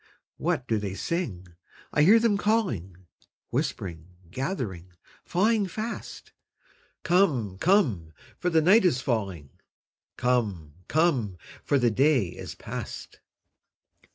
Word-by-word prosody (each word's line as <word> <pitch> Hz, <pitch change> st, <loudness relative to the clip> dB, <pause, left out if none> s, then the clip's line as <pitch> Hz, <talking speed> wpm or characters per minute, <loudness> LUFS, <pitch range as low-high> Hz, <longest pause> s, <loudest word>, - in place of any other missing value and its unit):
What 125 Hz, -, -1 dB
do 110 Hz, -2 st, +1 dB
they 100 Hz, -2 st, -4 dB
sing? 115 Hz, -, -3 dB, 0.5 s
I 150 Hz, -, +3 dB
hear 200 Hz, +9 st, +7 dB
them 225 Hz, -2 st, +2 dB
calling, 120 Hz, -, -1 dB, 0.5 s
Whispering, 85 Hz, -3 st, -3 dB, 0.2 s
gathering, 100 Hz, -, -4 dB, 0.3 s
flying 205 Hz, +3 st, +2 dB
fast, 215 Hz, +6 st, -6 dB, 0.7 s
'Come, 140 Hz, -, +2 dB
come, 130 Hz, -, +2 dB, 0.3 s
for 180 Hz, -, 0 dB
the 160 Hz, -2 st, +3 dB
night 205 Hz, +7 st, +6 dB
is 150 Hz, -9 st, +3 dB
falling; 100 Hz, -, -3 dB, 0.7 s
Come, 105 Hz, -12 st, 0 dB
come, 135 Hz, -, +1 dB, 0.3 s
for 145 Hz, -, +2 dB
the 120 Hz, -3 st, +3 dB
day 135 Hz, -1 st, +3 dB
is -, -, -8 dB
past!' -, -, -7 dB
130 Hz, 110 wpm, -27 LUFS, -, 0.7 s, hear